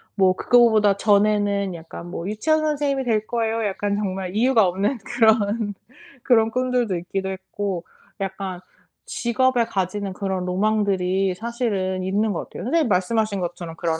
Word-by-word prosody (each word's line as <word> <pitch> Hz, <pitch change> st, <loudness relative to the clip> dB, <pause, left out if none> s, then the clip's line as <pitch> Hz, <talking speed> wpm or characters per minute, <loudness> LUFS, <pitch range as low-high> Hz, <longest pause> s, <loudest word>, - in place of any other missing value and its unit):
뭐 190 Hz, -2 st, +4 dB
그거보다 220 Hz, -5 st, +4 dB
전에는 205 Hz, -2 st, +2 dB
약간 170 Hz, +1 st, -9 dB
뭐 175 Hz, +1 st, -5 dB
"유치원 310 Hz, +9 st, +1 dB
선생님이 290 Hz, -3 st, 0 dB
될 220 Hz, -3 st, +1 dB
거예요." 225 Hz, -1 st, -1 dB
약간 200 Hz, 0 st, -1 dB
정말 190 Hz, -2 st, -3 dB
이유가 230 Hz, -3 st, +4 dB
없는 200 Hz, +7 st, -1 dB
그런 220 Hz, -2 st, +2 dB, 0.5 s
그런 225 Hz, -3 st, +3 dB
꿈들도 250 Hz, -5 st, 0 dB
있기도 190 Hz, +2 st, -3 dB
했고 190 Hz, -1 st, -4 dB, 0.4 s
약간 190 Hz, -1 st, -4 dB, 0.5 s
직업에 245 Hz, 0 st, +1 dB
가지는 195 Hz, 0 st, -3 dB
그런 190 Hz, -2 st, -3 dB
로망들이 195 Hz, -1 st, +1 dB
사실은 205 Hz, -5 st, -2 dB
있는 205 Hz, +3 st, 0 dB
것 170 Hz, -, -4 dB
같아요. -, -, -8 dB
선생님이 310 Hz, +1 st, +2 dB
말씀하신 205 Hz, +2 st, +1 dB
것처럼 175 Hz, -1 st, -5 dB
그런 165 Hz, -1 st, -1 dB
205 Hz, 340 characters per minute, -22 LUFS, 190-230 Hz, 0.5 s, 뭐